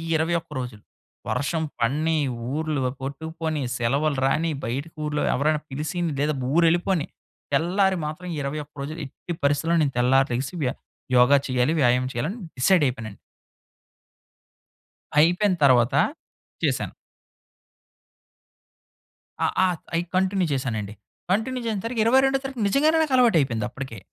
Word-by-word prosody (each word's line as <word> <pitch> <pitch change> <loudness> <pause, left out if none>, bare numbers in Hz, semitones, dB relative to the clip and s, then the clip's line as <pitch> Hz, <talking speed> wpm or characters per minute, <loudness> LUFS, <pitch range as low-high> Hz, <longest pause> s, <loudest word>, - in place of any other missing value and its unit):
21 165 +1 0
రోజులు 120 -5 -7 0.5
వర్షం 160 +5 -1 0.2
పడిని, 150 +7 +1 0.4
ఊర్లు 155 -1 -1 0.2
కొట్టుకుపోని, 160 +2 -4
సెలవులు 140 +5 0
రాని, 160 +5 +1
బయట 125 +6 -2 0.2
ఊర్లో 150 0 -1
ఎవరైనా 150 +2 +1
పిలిసి 150 +5 -3 0.2
లేదా 150 +1 +1 0.2
ఊరెళ్ళిపోని 170 0 +2 0.5
తెల్లారి 190 +6 +2
మాత్రం 155 +4 -6
ఈ - - -5
21 150 +1 -5
రోజులు 155 +4 -5
ఎట్టి 155 +5 -7
పరిస్థితిలో 145 +4 +2
నేను 140 -3 +1
తెల్లారి 130 +2 +4
లెగిసి 130 +5 -2
వ్య 130 - +1 0.5
యోగ 125 +2 +6 0.2
చేయాలి. 130 +3 +1
వ్యాయామం 125 0 +3
చేయాలి. 120 +4 -1
అని 235 - -8 0.2
డిసైడ్ 175 +5 +4
అయిపోయానండి. 115 -5 -5 2.0
అయిపోయిన 180 +5 +4
తరువాత 125 -2 +5 0.7
చేశాను. - - 0 2.5
అ - - +4 0.2
అ - - +5 0.3
అయ్ 165 - +2
కంటిన్యూ 190 0 +2
చేసానండి. 110 -6 -3 0.4
కంటిన్యూ 225 +6 0
చేసేసరికి 225 +2 -2
22 265 +3 +4
తారీఖ 270 -2 -6
నిజంగానే 300 +10 +3
నాకు 305 -3 -1
అలవాటు 240 -6 +5
అయిపోయింది. 115 -6 -1
అప్పటికే 130 -5 -7
150 Hz, 120 wpm, -24 LUFS, 130-180 Hz, 2.5 s, యోగ